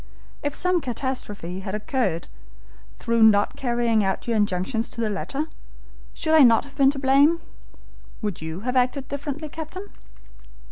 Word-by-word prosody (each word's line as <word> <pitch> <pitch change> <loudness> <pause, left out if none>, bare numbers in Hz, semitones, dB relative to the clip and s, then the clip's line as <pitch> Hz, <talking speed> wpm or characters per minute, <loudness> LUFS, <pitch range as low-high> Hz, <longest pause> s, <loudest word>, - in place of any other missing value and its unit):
If 290 0 -2
some 365 -1 +2
catastrophe 225 - -4
had 190 +1 -4
occurred 210 - -1 0.7
through 230 0 0
not 210 -2 +5
carrying 235 -3 +1
out 190 +3 -2
your 235 - +1
injunctions 205 +3 0
to - - -8
the 220 -2 0
letter, 275 +9 -3 0.7
should 315 -2 +4
not 230 +3 +3
I - - -12
have 280 - -20
been 275 -1 +5
to 280 - -2
blame? 280 +5 +4 0.8
Would 205 -6 -3
you 160 +3 -5
have 250 +3 -2
acted 255 +2 +1
differently, 285 +2 -5
captain?" 325 +6 -7
245 Hz, 150 wpm, -24 LUFS, 210-285 Hz, 0.8 s, not